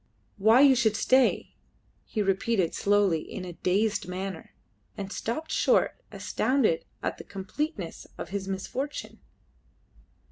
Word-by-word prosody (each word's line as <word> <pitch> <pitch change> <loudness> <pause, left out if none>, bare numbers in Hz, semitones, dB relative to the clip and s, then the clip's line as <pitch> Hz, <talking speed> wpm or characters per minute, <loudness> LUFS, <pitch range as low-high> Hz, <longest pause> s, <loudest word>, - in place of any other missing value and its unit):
"Why 220 +6 +6
you 280 -1 +8
should 230 -4 +2
stay!" 260 +3 +3 0.5
he 215 - -1
repeated 195 -1 +1
slowly, 200 -5 +3
in 185 - -7
a 175 - -7
dazed 200 +3 0
manner, 185 -1 -6 0.4
and 195 -1 -5
stopped 310 +8 -3
short, - - +2
astounded 255 -11 +1 0.2
at - - -2
the - - -7
completeness 200 - -5
of - - -6
his 195 0 -4
misfortune. 255 +9 -4
205 Hz, 120 wpm, -28 LUFS, 190-255 Hz, 0.5 s, you